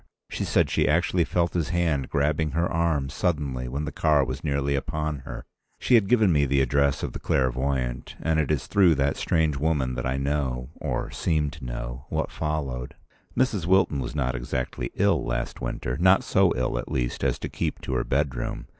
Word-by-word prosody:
She - - -2
said - - +3
she - - +2
actually 85 +2 +2
felt 85 -1 0
his 85 -4 -1
hand 80 -7 0
grabbing 75 +2 0
her 85 +2 +1
arm, 80 -4 0
suddenly, 70 -8 -1
when 70 +4 -3
the 80 - -4
car 75 -4 +3
was 65 +2 -5
nearly 70 -2 0
upon 75 +1 -2
her. 65 - -8 0.3
She - - +1
had 110 -5 +6
given 110 -6 +4
me 75 -3 +3
the 70 +1 +2
address 70 +1 +2
of - - -3
the - - -5
clairvoyant; 65 -1 -1
and 80 -1 +1
it 75 - 0
is 75 -4 0
through 95 -5 +4
that 70 0 +1
strange 80 -4 +1
woman 70 -4 0
that 65 - -2
I 65 +1 -1
know—or 70 -1 -2
seem 75 -4 0
to 75 -4 -10
know—what - - -4
followed. 70 -5 -3 0.4
Mrs. 110 -9 +1
Wilton 95 -6 +3
was 60 +2 -4
not 65 -4 0
exactly 65 0 -3
ill - - +2
last - - -3
winter, 60 +1 -3
not 95 +2 +5
so - - +3
ill, 65 - -1
at - - -6
least, - - -2
as - - +1
to - - -5
keep - - -3
to 65 - -4
her 60 -1 +1
bedroom. 70 -3 -2
70 Hz, 190 wpm, -26 LUFS, 65-80 Hz, 0.4 s, had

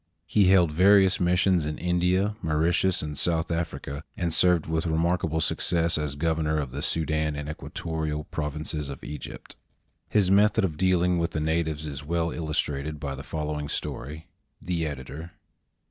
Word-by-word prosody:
He 100 +5 +3
held 90 -4 +5
various 95 +3 +5
missions 90 -2 +2
in 75 - -3
India, 90 +4 +1
Mauritius, 85 +3 +1
and 75 -1 -5
South 80 +2 0
Africa, 80 -3 -4
and 85 -2 -1
served 90 -1 +4
with 80 +1 -1
remarkable 80 0 +1
success 85 +1 +1
as 75 -2 -2
governor 80 0 0
of 70 -4 -2
the - - -5
Soudan 80 -1 0
and 75 0 -5
Equatorial 75 0 -4
provinces 75 -1 -4
of 70 - -8
Egypt. 75 - -8 0.5
His 100 -3 +3
method 100 0 +4
of 80 -5 -3
dealing 90 0 +2
with 85 0 -1
the 80 - -1
natives 80 -1 -1
is 70 -1 -6
well 85 +2 -1
illustrated 75 -2 -2
by 70 -2 -4
the 70 - -7
following 75 +1 -4
story. 75 +5 -5 0.3
The 85 -2 -2
Editor. 75 +4 -7
80 Hz, 155 wpm, -26 LUFS, 75-85 Hz, 0.5 s, held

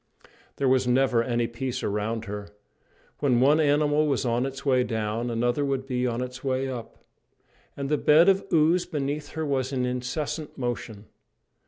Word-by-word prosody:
There 140 - 0
was 130 -1 +3
never 125 -1 +3
any 120 -1 0
peace 120 +2 -4
around 110 +2 -2
her. 105 0 -6 0.7
When 130 -5 +2
one 145 +5 +5
animal 150 0 +3
was 135 -2 0
on 120 +2 +1
its 135 +1 -8
way 130 -2 +3
down, 110 +1 -2
another 120 +4 0
would 135 -1 -1
be 125 -1 -1
on 120 +1 -2
its 125 0 -8
way 135 0 0
up. 125 -3 -8 0.7
And 140 -1 -3
the 150 0 +1
bed 160 +4 +5
of 195 0 +4
ooze 165 +2 +3
beneath 145 -2 -3
her 160 0 -2
was 135 -2 -1
in 130 -2 0
incessant 125 +5 -4
motion. 120 -4 -4
130 Hz, 170 wpm, -26 LUFS, 120-145 Hz, 0.7 s, one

